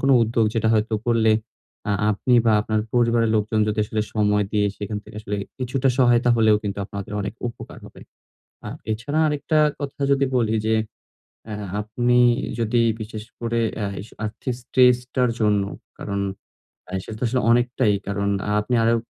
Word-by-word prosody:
কোনো 135 0 +3
উদ্যোগ 115 0 +1
যেটা 110 -1 +1
হয়তো 110 +1 +1
করলে 115 -2 +3 0.6
আ - - +2 0.2
আপনি 115 +4 +1
বা 110 - +5
আপনার 110 0 0
পরিবারের 115 -2 +3
লোকজন 110 +1 0
যদি 105 - -2
আসলে 110 0 -2
সময় 105 -1 +2
দিয়ে 105 -1 +2
সেখান 105 0 -4
থেকে - - -12
আসলে 105 -1 -4 0.2
কিছুটা 130 +1 0
সহায়তা 120 -1 +4
হলেও 110 -2 +5
কিন্তু 100 -1 -4
আপনাদের 100 0 -7
অনেক 100 +1 -4
উপকার 115 - -10
হবে। - - -13 0.7
আ - - -5 0.2
এছাড়া 130 +8 -2
আরেকটা 150 +1 0 0.2
কথা 140 0 -6
যদি 140 0 +3
বলি 110 -2 +1
যে 110 0 +2 0.7
অ্যা 105 - -5 0.3
আপনি 120 +3 +1 0.4
যদি 115 +1 +2 0.2
বিশেষ 110 0 -6 0.2
করে 115 0 -1 0.2
এ্যাস 100 -1 -4 0.2
আর্থিক 110 +4 -3
স্ট্রেসটার 125 0 +3
জন্য 105 -2 +3 0.3
কারণ 100 0 -4 0.7
আ - - -11
সেটা 110 - -8
তো - - -3
আসলে 125 +2 0
অনেকটাই 120 -2 +2
কারণ 100 0 -1 0.3
আপনি 105 - -3
আরও 115 +1 +4
115 Hz, 160 wpm, -23 LUFS, 105-125 Hz, 0.7 s, বা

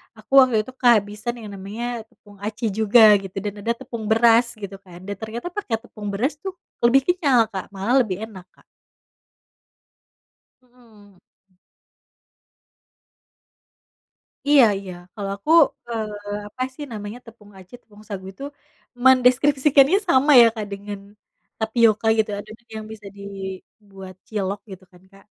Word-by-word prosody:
aku 215 +4 -19
waktu 255 -3 +4
itu 260 - -11
kehabisan 215 -1 +2
yang 215 -2 -9
namanya 205 +5 -6 0.2
tepung 205 -2 -20
aci 215 +2 -4
juga 220 +2 +5 0.2
gitu 190 0 -10
dan 205 - -3
ada 230 +3 0
tepung 230 -2 -7
beras 230 +1 +5 0.2
gitu 200 -1 -7
kan 175 -1 -13
dan 200 - -4
ternyata 225 +7 -6
pake 330 - -4
tepung 210 -3 -9
beras 255 +10 0
tuh 385 -1 -4 0.3
lebih 260 +3 +5
kenyal, 290 -9 +2
Kak, 190 -1 -5
malah 200 +7 0
lebih 190 -6 -3
enak, 190 -5 -10
Kak. - - -25 2.0
Mhm. 220 -6 -22 0.3
M 185 - -36 2.9
Iya 285 -3 +7
iya. 190 -2 -8 0.2
Kalau 200 -3 -5
aku, 200 +10 -6 0.4
eee, 210 -2 -5
apa 255 +5 -7
sih 295 - -7
namanya, 210 +2 -7
tepung 210 -2 -16
aci, 185 +2 -17
tepung 210 -1 -18
sagu 190 -2 -6
itu 275 - -10 0.6
mendeskripsikannya 270 +4 +5
sama 275 0 +4
ya, 235 - +8
Kak, 215 - -4
dengan 200 0 -6 0.6
tapioka 220 -1 +2
gitu 215 -1 +1
adonan 220 +3 -12
yang 215 - -6
bisa 210 -2 -12
dibuat 195 0 -10
cilok 200 -2 -3
gitu 190 0 -11
kan, 180 0 -20
Kak. 195 0 -19
215 Hz, 140 wpm, -22 LUFS, 200-240 Hz, 2.9 s, ya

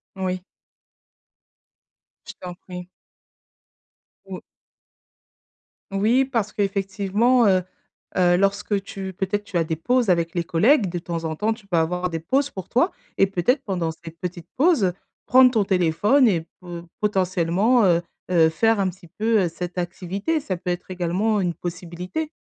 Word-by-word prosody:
Oui. 185 -1 -2 1.8
Je - - -8
t'en 180 -1 -7
prie. 180 -1 -9 1.4
Ou - - -7 1.5
Oui, 220 +7 +3
parce 230 -6 -2
qu'effectivement, 200 +4 +2
heu 185 -1 +3 0.5
heu, 175 -1 +4
lorsque 200 +1 +1
tu 195 -1 -6
peut-être, 195 +3 -2
tu 200 -3 -3
as 165 - +3
des 160 0 -2
pauses 245 +6 +1
avec 170 0 +1
les 170 - 0
collègues, 195 - +3
de 175 0 -3
temps 170 -1 -4
en 160 -1 -2
temps, 215 +6 0
tu 220 -2 -16
peux 180 -3 0
avoir 180 +2 0
des 165 - -2
pauses 270 - 0
pour 190 -2 -7
toi 255 +10 +2 0.3
et 195 - +5
peut-être 195 - +1
pendant 180 -5 -2
ces 165 +1 -11
petites 175 0 -7
pauses, 270 - +3 0.3
prendre 255 0 +7
ton 220 -4 +2
téléphone 195 - +3
et 170 -6 +1
po 175 -2 -8 0.2
potentiellement, 195 +3 +2
heu-heu, 170 -1 +2
faire 225 +6 +2
un 195 -1 +2
petit 175 -1 -13
peu, 220 +4 +1
heu, - - -1
cette 180 +2 -5
activité, 190 - -2
ça 190 - -4
peut 180 - -5
être 175 +1 -4
également 185 +5 0
une 175 -2 -1
possibilité. 180 - -5
185 Hz, 150 wpm, -23 LUFS, 175-215 Hz, 1.8 s, prendre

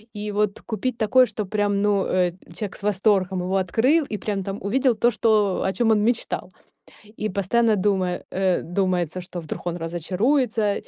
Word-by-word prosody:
и 210 0 -4
вот 205 -1 0
купить 235 +2 -3
такой, 245 +3 +4
что 210 -1 -4
прям, 205 0 0
ну, 205 -2 +2
э, 180 -1 +1 0.2
человек 210 -3 -5
с - - -9
восторгом 195 -2 +1
его 190 +2 0
открыл 250 - +2
и 210 - -1
прям 200 -2 -3
там 195 +1 -4
увидел 250 +4 +1
то, 240 +3 +3
что 210 -4 +2
о - - 0
чём 235 -2 +2
он 210 -1 +3
мечтал. 235 +1 -1 0.7
И 215 - 0
постоянно 215 +3 +2
дума 190 -1 +1 0.2
э, 190 -1 +1
думается, 180 -1 -1
что 180 0 -7
вдруг 160 - -7
он 175 0 -1
разочаруется. 205 - 0
205 Hz, 175 wpm, -23 LUFS, 185-220 Hz, 0.7 s, такой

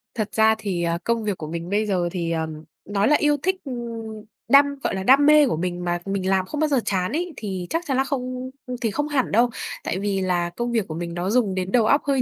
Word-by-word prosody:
Thật 215 -2 -2
ra 220 0 +4
thì, 195 -5 -2
ờ, 170 0 0
công 230 -1 0
việc 205 -3 -2
của 155 - -6
mình 170 +2 -5
bây 210 +2 +1
giờ 180 -4 0
thì, 170 -2 -2
ờ, 160 -1 -1 0.4
nói 205 0 +2
là 300 - +5
yêu 295 -1 +3
thích, 375 +1 +2
ừm, 260 - -4 0.8
đam 280 +1 +8 0.2
gọi - - 0
là, 190 - -3
đam 275 +6 +6
mê 300 -1 +7
của 200 - -1
mình 175 +1 -3
mà 175 0 0
mình 195 -1 -2
làm 190 -1 +2
không 300 +9 -5
bao 310 - +3
giờ 275 -3 +2
chán 185 -2 0
ấy 340 +2 -2
thì 190 -5 -4
chắc 330 +1 -1
chắn 270 - 0
là 265 - +3
không 255 -2 -4 0.3
thì 225 - 0
không 295 +7 -1
hẳn 285 -4 0
đâu. 235 +3 +4 0.3
Tại 185 - -2
vì 200 -1 -1
là 175 -2 0
công 240 +7 -3
việc 225 -5 0
của 155 - -5
mình 170 0 -4
nó 175 +2 -2
dùng 215 -4 +2
đến 185 0 -2
đầu 235 -3 +4
óc 280 +6 +4
hơi 275 -2 +2
210 Hz, 265 wpm, -23 LUFS, 180-265 Hz, 0.8 s, đam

